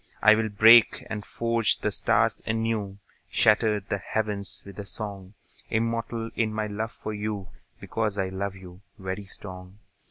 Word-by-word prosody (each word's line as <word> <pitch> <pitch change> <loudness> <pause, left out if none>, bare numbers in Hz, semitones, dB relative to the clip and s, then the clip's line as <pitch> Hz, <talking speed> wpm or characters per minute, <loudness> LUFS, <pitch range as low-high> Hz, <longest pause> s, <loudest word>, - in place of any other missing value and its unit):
I'll 110 +1 +6
break 110 +2 +6
and 105 -1 -3
forge 115 -1 0
the - - -1
stars - - +2
anew, 110 -3 -1 0.3
Shatter 105 0 +3
the 100 +1 -3
heavens 105 0 -3
with 100 +1 -10
a 100 - -5
song; 100 0 -4 0.3
Immortal 115 0 -1
in 110 -2 +1
my 110 0 -2
love 110 +2 -3
for 110 - -6
you, 105 -2 -4 0.3
Because 110 -2 -2
I 95 -1 0
love 95 +1 -3
you, 90 -1 -12 0.2
very 95 +1 -5
strong. 95 -1 -7
105 Hz, 150 wpm, -26 LUFS, 100-110 Hz, 0.3 s, I'll